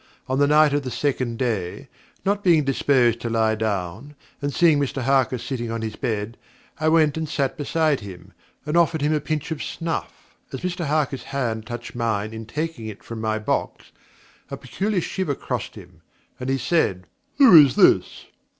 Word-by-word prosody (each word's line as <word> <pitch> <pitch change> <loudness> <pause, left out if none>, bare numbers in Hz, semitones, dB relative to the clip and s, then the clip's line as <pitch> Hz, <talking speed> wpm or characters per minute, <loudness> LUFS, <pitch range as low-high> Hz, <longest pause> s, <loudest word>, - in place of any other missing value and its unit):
On 130 +1 -1
the 145 - +4
night 150 0 +5
of 145 - +1
the 130 - -5
second 125 -3 -2
day, 105 -9 -3 0.4
not 200 +1 0
being 165 -5 +4
disposed 130 -3 +2
to 120 - -3
lie 110 -1 +2
down, 110 +5 -3 0.3
and 145 0 -1
seeing 160 0 +4
Mr 135 -2 -2
Harker 130 0 +2
sitting 120 -1 -4
on 115 0 -3
his 110 -1 -4
bed, 115 -3 -3 0.4
I 155 0 +2
went 155 -2 +3
and 160 -1 -3
sat 140 -3 -1
beside 155 0 0
him, 95 -4 -11 0.3
and 150 +2 -2
offered 165 -3 +2
him 150 +1 +2
a 155 - +1
pinch 155 +2 -3
of 155 - -3
snuff. 165 -1 -5 0.2
As 135 - -6
Mr 180 -1 -3
Harker's 145 -3 -1
hand 115 -6 -3
touched 120 0 -7
mine 110 -3 -2
in 110 -1 -8
taking 150 -2 -4
it 105 -2 -9
from 115 -1 -7
my 110 0 0
box, 110 - -3 0.6
a - - -5
peculiar 200 -1 -2
shiver 175 -5 -2
crossed - - -5
him, - - -14 0.4
and 125 +1 -4
he 135 - +1
said: 120 - 0 0.3
'Who 265 -10 +8
is 135 - 0
this!' - - +3
135 Hz, 185 wpm, -23 LUFS, 115-155 Hz, 0.6 s, Who